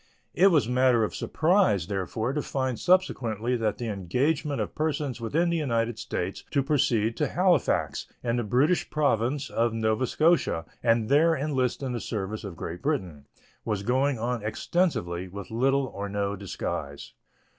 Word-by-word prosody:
It 190 - +5
was 155 - +3
matter 125 -2 +3
of 105 - -2
surprise, 155 - +2
therefore, 105 +5 -2
to 150 - -1
find 130 -3 -2
subsequently 125 - +1
that 110 -3 -1
the 120 - -4
engagement 130 - -1
of - - -3
persons 150 -5 -2
within 165 +10 +1
the 170 - +1
United 115 -6 -1
States 95 -4 -4
to 140 -2 +1
proceed 125 -6 +1
to 150 - +1
Halifax, 175 -2 +1 0.2
in 120 0 0
the 120 - 0
British 135 - +2
Province 140 -1 0
of 115 0 +1
Nova 110 +3 +1
Scotia, 155 - +2 0.2
and 115 -2 +2
there 160 +5 +4
enlist 135 -2 -1
in 130 - -2
the 120 - -2
service 105 0 -4
of 100 -4 -7
Great 85 +2 -6
Britain, 90 - -3 0.4
was 105 -3 -2
going 130 +4 +1
on 120 +1 -2
extensively, 105 - -1
with 100 +2 -9
little 135 +4 +2
or 100 -5 -6
no 100 0 -1
disguise. 90 -7 -5
120 Hz, 160 wpm, -27 LUFS, 105-145 Hz, 0.4 s, It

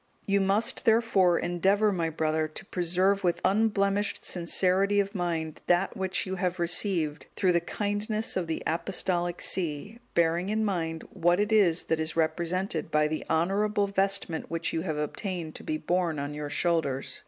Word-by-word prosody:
You 200 0 +2
must, 195 +3 +1
therefore, 220 -6 +4
endeavour, 195 +5 +2
my 170 -4 -1
brother, 155 0 0
to 155 - -9
preserve 185 +2 +1
with 175 -2 +1
unblemished 200 -1 +1
sincerity 190 +3 +2
of 200 +1 -1
mind 165 -5 -3
that 175 +2 +2
which 190 -1 -1
you 190 0 -4
have 180 -1 -1
received 170 -3 0
through 185 - +2
the 170 -1 +2
kindness 210 +4 -2
of 180 -3 -1
the 160 - -3
Apostolic 175 0 -1
see, 185 +6 -1 0.2
bearing 170 +2 +2
in 220 +1 0
mind 165 -5 -2
what 175 0 +2
it 210 +1 0
is 185 -6 +4
that 160 - -1
is 160 0 -2
represented 165 +1 -1
by 150 0 +2
the 155 0 -3
honourable 200 +5 +1
vestment 195 -4 0
which 165 0 -2
you 165 - -1
have 160 -4 -3
obtained 165 +2 -4
to - - -10
be 310 -1 -2
borne 175 - -1
on 145 +1 -4
your 150 0 -5
shoulders. 150 -5 -1
180 Hz, 165 wpm, -28 LUFS, 165-200 Hz, 0.2 s, therefore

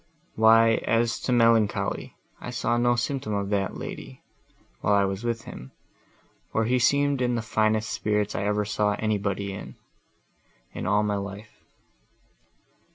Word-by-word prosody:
—"Why, 115 +1 +5
as 115 0 +1
to - - -3
melancholy, 115 -3 +2 0.2
I - - -7
saw 120 -1 -1
no 120 0 +3
symptom 120 -3 -2
of 100 -1 -2
that, 100 -2 -1
lady, 65 +1 -8 0.6
while 100 +1 +2
I 100 0 +3
was 95 +2 -4
with 115 -1 -2
him, 65 +2 -10 0.8
for 110 - +1
he 125 +2 +2
seemed 140 +1 +2
in 125 -1 +1
the 115 - -2
finest 110 -1 0
spirits 105 -1 -1
I 100 - -2
ever 105 0 0
saw 105 0 0
anybody 100 -2 -2
in, - - -8 1.0
in - - -5
all 105 +1 +3
my 105 -1 0
life. 100 +2 -7
110 Hz, 150 wpm, -26 LUFS, 100-115 Hz, 1.0 s, Why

